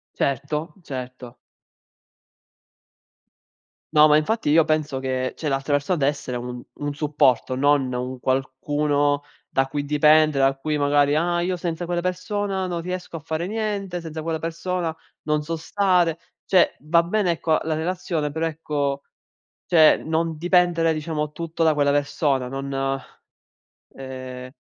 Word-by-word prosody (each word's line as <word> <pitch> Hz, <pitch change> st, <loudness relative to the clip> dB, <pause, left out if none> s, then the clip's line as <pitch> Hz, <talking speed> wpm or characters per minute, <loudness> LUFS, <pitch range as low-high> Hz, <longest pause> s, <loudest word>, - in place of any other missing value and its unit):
Certo, 145 Hz, +4 st, -2 dB
certo. 125 Hz, -3 st, -7 dB, 2.6 s
No, 150 Hz, 0 st, +7 dB
ma 150 Hz, -, +6 dB
infatti 185 Hz, +6 st, 0 dB
io 155 Hz, +2 st, +5 dB
penso 155 Hz, -4 st, 0 dB
che 130 Hz, -1 st, -2 dB
cioè, 155 Hz, -, -3 dB
l'altra 135 Hz, +2 st, 0 dB
persona 145 Hz, +5 st, +1 dB
deve 140 Hz, -1 st, +3 dB
essere 130 Hz, -4 st, -5 dB
un 125 Hz, 0 st, -6 dB
un 145 Hz, 0 st, -3 dB
supporto, 145 Hz, -5 st, +2 dB
non 140 Hz, -1 st, +2 dB
un 125 Hz, +1 st, -4 dB
qualcuno 145 Hz, +2 st, 0 dB, 0.3 s
da 135 Hz, 0 st, +1 dB
cui 145 Hz, +1 st, -3 dB
dipendere, 150 Hz, 0 st, +4 dB
da 135 Hz, 0 st, +2 dB
cui 150 Hz, +2 st, -2 dB
magari: 145 Hz, 0 st, +3 dB
"Ah 175 Hz, +2 st, +1 dB
io 180 Hz, 0 st, -1 dB
senza 170 Hz, -1 st, -3 dB
quella 175 Hz, 0 st, -1 dB
persona 190 Hz, +2 st, -2 dB
non 175 Hz, -2 st, -3 dB
riesco 180 Hz, 0 st, -5 dB
a -, -, -7 dB
fare 160 Hz, +2 st, -3 dB
niente, 200 Hz, -4 st, -3 dB
senza 160 Hz, -1 st, -6 dB
quella 160 Hz, 0 st, -2 dB
persona 165 Hz, +1 st, -3 dB, 0.3 s
non 150 Hz, -1 st, +1 dB
so 165 Hz, +2 st, -3 dB
stare". 180 Hz, -2 st, +1 dB, 0.3 s
Cioè, 185 Hz, -2 st, +4 dB
va 165 Hz, +3 st, +3 dB
bene 180 Hz, +1 st, +1 dB
ecco 160 Hz, -1 st, +1 dB
la 160 Hz, 0 st, -1 dB
relazione, 160 Hz, -2 st, -2 dB
però 160 Hz, +2 st, -1 dB
ecco, 145 Hz, -3 st, -2 dB, 0.6 s
cioè, 160 Hz, -3 st, +6 dB
non 160 Hz, 0 st, -1 dB
dipendere 175 Hz, -1 st, +3 dB
diciamo 150 Hz, -1 st, -3 dB
tutto 165 Hz, +1 st, -3 dB
da 160 Hz, -, +5 dB
quella 145 Hz, -1 st, +2 dB
persona, 145 Hz, -2 st, 0 dB
non, 135 Hz, 0 st, -2 dB, 0.9 s
ehm 130 Hz, -1 st, -7 dB
150 Hz, 145 wpm, -23 LUFS, 140-170 Hz, 2.6 s, No